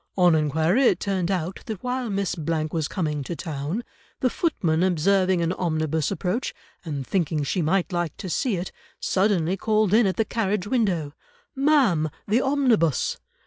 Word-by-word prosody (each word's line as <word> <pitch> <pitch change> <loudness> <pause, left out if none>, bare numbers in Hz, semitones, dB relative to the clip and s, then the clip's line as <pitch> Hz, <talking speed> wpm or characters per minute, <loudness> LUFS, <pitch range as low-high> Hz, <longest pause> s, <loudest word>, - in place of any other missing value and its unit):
On 180 -2 +5
enquiry 160 - +2
it 180 - +4
turned 190 -3 -1
out 185 -1 -2
that 215 -4 -5
while 250 -1 -2
Miss 195 -2 -1 0.2
—— 155 0 -2
was 160 -3 -1
coming 150 -6 -2
to 170 - -5
town, 160 +6 -4 0.4
the 255 - +1
footman 175 - 0
observing 185 0 +2
an 170 +2 0
omnibus 160 -4 -1
approach, 195 +4 -2 0.3
and 145 -5 -4
thinking 160 -4 0
she 180 +6 -1
might 180 +3 +1
like 175 -3 -2
to 195 - -6
see 215 +5 0
it, 180 +1 -4 0.3
suddenly 190 -3 +1
called 215 0 +1
in 220 -1 +5
at 190 - 0
the 225 - +1
carriage 210 -4 -1
window, 195 - 0 0.4
'Ma'am, 265 - +3 0.2
the 220 +5 +3
omnibus! 250 - +2
185 Hz, 165 wpm, -24 LUFS, 160-215 Hz, 0.4 s, On